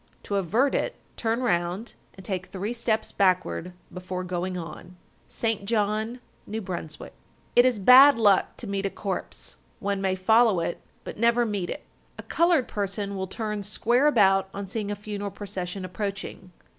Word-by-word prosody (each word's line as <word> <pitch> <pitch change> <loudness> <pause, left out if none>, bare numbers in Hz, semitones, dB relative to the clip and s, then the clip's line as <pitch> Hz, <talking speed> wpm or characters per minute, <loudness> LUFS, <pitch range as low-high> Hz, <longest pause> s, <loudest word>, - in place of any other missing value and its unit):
To 200 - -2
avert 220 - +2
it, - - -1 0.2
turn 230 +1 -1
round 180 +1 -1 0.2
and 190 - -12
take 185 -2 -3
three 200 +4 -4
steps 225 -2 -1
backward 185 -2 +1 0.2
before 185 0 -5
going 180 0 -3
on. 175 +1 -9 0.3
St. 225 -3 -2
John, 215 +2 0 0.3
N.B. 220 +2 -4
1260. 175 -5 -6 0.4
It 245 - +7
is 250 -3 +1
bad 255 +6 +8
luck 205 -4 +3
to - - -5
meet 200 -1 -1
a - - -3
corpse. 195 -1 -5 0.2
One 200 -1 -2
may 190 -1 +1
follow 220 +1 +4
it, 170 +1 -3 0.2
but - - -8
never 235 +1 +3
meet 200 -5 -2
it. - - -5 0.3
A - - -8
colored 335 -6 +2
person 200 0 -3
will 190 0 -3
turn 210 +1 -3
square 235 +7 +2
about 195 -7 +4
on 200 0 -4
seeing 205 +1 -3
a 205 - -2
funeral 205 0 -5
procession 190 -2 -5
approaching. 195 -1 -5
200 Hz, 165 wpm, -26 LUFS, 185-225 Hz, 0.4 s, bad